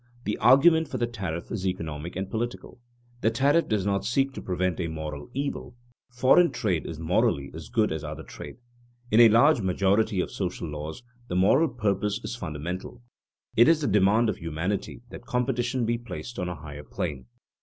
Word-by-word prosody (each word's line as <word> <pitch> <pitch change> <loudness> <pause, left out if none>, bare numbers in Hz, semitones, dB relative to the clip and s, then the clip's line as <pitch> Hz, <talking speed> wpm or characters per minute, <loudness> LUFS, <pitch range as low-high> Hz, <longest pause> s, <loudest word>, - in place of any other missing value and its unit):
The 105 - -2
argument 160 +5 +6
for 130 - -4
the 120 - +1
tariff 95 -8 -5
is 95 -3 -2
economic 80 -2 -4
and 95 +1 -3
political. 120 +4 -5 0.4
The 110 - +3
tariff 140 +8 +2
does 105 -4 0
not 100 -1 0
seek 135 +5 +1
to - - -7
prevent 90 -1 -1
a 85 - -1
moral 80 -1 -6
evil; 140 -3 -4 0.4
foreign 130 +8 +5
trade 105 - -1
is 80 - -6
morally 80 -4 +1
as - - -9
good - - +1
as - - -3
other - - -6
trade. - - -10 0.6
In 110 - +5
a 115 -1 +9
large 120 +4 +5
majority 100 +2 +1
of - - -1
social 90 -3 -3
laws 75 +9 -6 0.2
the 90 - -4
moral 130 - +4
purpose 105 -3 -1
is - - -4
fundamental. 90 +5 -6 0.5
It 120 - +6
is 165 -1 +4
the 145 - 0
demand 105 +3 +3
of 110 - -1
humanity 85 +8 -3
that - - -10
competition 125 0 0
be 120 +1 0
placed 120 -1 -7
on 90 -1 -2
a 90 - -4
higher 75 -1 -9
plane. 65 -4 -5
105 Hz, 185 wpm, -26 LUFS, 90-120 Hz, 0.6 s, a